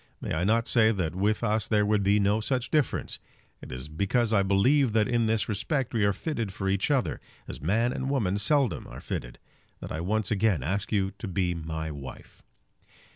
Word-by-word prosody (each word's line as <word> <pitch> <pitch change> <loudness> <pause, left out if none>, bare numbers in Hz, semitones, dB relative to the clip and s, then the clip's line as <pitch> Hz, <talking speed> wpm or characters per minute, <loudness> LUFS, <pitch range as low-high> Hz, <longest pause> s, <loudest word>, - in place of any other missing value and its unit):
May - - -4
I 80 +2 0
not 115 +4 +2
say 110 -2 +4
that 85 -6 -2
with 105 +5 0
us 110 -1 +1
there 105 -1 +2
would 105 0 +2
be 100 +1 +3
no 100 +2 +2
such 125 +2 -2
difference? 150 -5 0 0.4
It - - -10
is 65 +2 -6
because 105 +9 0
I 100 - +4
believe 110 +7 +3
that 110 -2 +3
in 120 -2 +1
this 110 -1 +1
respect 120 +5 -1
we 110 -3 +1
are 100 - +3
fitted 115 - -3
for 95 0 -4
each 100 +9 +1
other, 135 -4 0 0.3
as - - -8
man 115 - +1
and 130 - -3
woman 105 -8 0
seldom 135 +3 +1
are - - -9
fitted, - - -5 0.4
that - - -8
I 80 - -3
once 105 +3 -1
again 100 -8 +2
ask 95 +7 -2
you 100 -2 +1
to 110 - -5
be 90 -1 0
my 80 -1 -4
wife. 70 -3 -10
105 Hz, 205 wpm, -27 LUFS, 95-115 Hz, 0.4 s, say